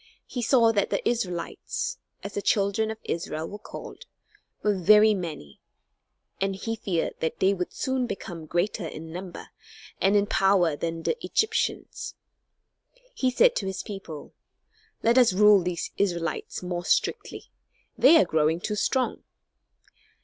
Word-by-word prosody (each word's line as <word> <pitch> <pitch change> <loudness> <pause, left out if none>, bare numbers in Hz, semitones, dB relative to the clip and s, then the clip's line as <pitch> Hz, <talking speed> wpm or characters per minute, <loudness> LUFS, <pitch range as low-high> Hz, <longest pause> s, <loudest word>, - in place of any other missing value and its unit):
He 245 - -5
saw 230 -1 +4
that 205 -3 0
the - - -1
Israelites 225 - -3 0.2
(as 200 - -6
the 205 - -2
children 200 +2 +1
of 220 - -4
Israel 160 -1 -3
were 205 - -8
called) - - -10 0.6
were 210 -1 +2
very 210 +4 +6
many, 155 - -6 0.8
and 195 0 0
he 225 +4 -3
feared 185 -6 -2
that 160 - -2
they 190 +1 +4
would 180 -2 -3
soon 260 -2 -1
become 170 -7 -7
greater 175 +2 -1
in 160 +1 -8
number 180 0 -8 0.5
and 195 +2 +3
in 205 0 +4
power 190 -6 +3
than 165 +2 -4
the 475 - -2
Egyptians. 440 - -1 1.0
He 260 - +1
said 480 - +4
to 195 - -2
his 190 - -4
people: 195 -8 -8 0.7
"Let 235 +3 +5
us 240 -6 +5
rule 210 0 +6
these 175 -1 -3
Israelites 175 -2 -2
more 175 -1 -3
strictly. - - -1 0.4
They 310 +5 +7
are - - +5
growing 160 0 +1
too 210 +3 -3
strong." 255 +5 0
195 Hz, 145 wpm, -26 LUFS, 175-220 Hz, 1.0 s, They